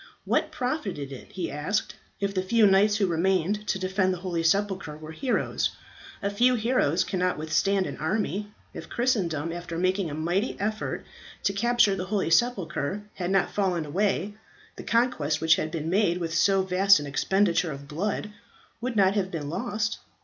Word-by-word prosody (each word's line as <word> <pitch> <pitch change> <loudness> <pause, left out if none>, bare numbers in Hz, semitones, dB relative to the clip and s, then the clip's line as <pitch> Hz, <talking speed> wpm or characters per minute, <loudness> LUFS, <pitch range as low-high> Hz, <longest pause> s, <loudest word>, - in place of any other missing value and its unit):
"What - - +1
profited 245 - -3
it," 135 - -10
he 180 -3 -3
asked, 155 +9 -2 0.2
"if 200 -1 -1
the 185 - 0
few 215 +4 +3
knights 200 +2 +5
who 205 - +2
remained 190 +4 0
to - - 0
defend 185 0 +1
the 185 - -2
holy 175 -2 -2
sepulchre 190 -2 0
were 155 0 -9
heroes? 255 - 0 0.5
A 200 - 0
few 245 +5 +3
heroes 220 - +2
cannot 180 -1 -1
withstand 185 +5 +1
an - - -5
army. 205 +4 -2 0.2
If - - -8
Christendom 170 - 0
after 175 -1 -6
making 185 0 +1
a 145 - -5
mighty 175 +9 -1
effort 215 +1 -3 0.4
to 200 - +1
capture 235 -1 +3
the 185 -1 -4
holy 195 -3 -1
sepulchre 195 -3 +1
had 180 -1 -3
not 195 -1 +2
fallen 185 -5 0
away, 200 +5 0 0.4
the - - -8
conquest 230 - +1
which 160 0 +4
had 155 - -2
been 155 -1 -4
made 180 -1 +2
with 165 -2 -3
so 190 +3 +3
vast 190 0 +5
an 145 - -5
expenditure 175 +4 +1
of 140 0 -8
blood 205 +7 -3 0.5
would 245 0 -3
not 195 -2 +4
have 195 -2 0
been 155 -5 -4
lost. 215 +3 -2
190 Hz, 175 wpm, -26 LUFS, 165-210 Hz, 0.5 s, knights